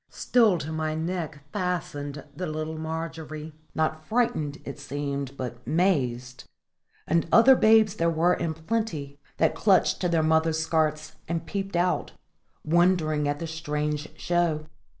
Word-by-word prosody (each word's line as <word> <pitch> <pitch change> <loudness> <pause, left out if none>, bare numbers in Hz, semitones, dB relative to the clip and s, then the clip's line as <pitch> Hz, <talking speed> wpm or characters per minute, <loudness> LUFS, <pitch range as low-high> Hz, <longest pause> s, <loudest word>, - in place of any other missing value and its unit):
Still 225 -7 +3
to 155 0 -5
my 155 -1 -2
neck 160 -3 -4
fastened 150 -7 -3
the 180 +4 -3
little 155 +1 -4
Margery 160 -1 -5 0.2
not 155 0 0
frighted, 155 -8 0
it 140 - -7
seemed, 140 -1 -4
but 125 -2 -4
mazed 125 -8 0 0.6
and 165 0 +1
other 260 +3 +8
babes 220 -3 +5
there 170 -5 +1
were 165 +2 +3
in 165 -3 -2
plenty, 160 -6 -3 0.2
that 160 - +3
clung 195 -4 +4
to 180 - -1
their 165 -2 +2
mothers' 160 0 +2
skirts 155 -1 0
and 165 0 -2
peeped 195 +1 -4
out, 175 -3 0 0.5
wondering 160 -3 +2
at 145 0 0
the 165 - -5
strange 150 -1 -3
show. 170 -3 0
160 Hz, 140 wpm, -26 LUFS, 150-175 Hz, 0.6 s, other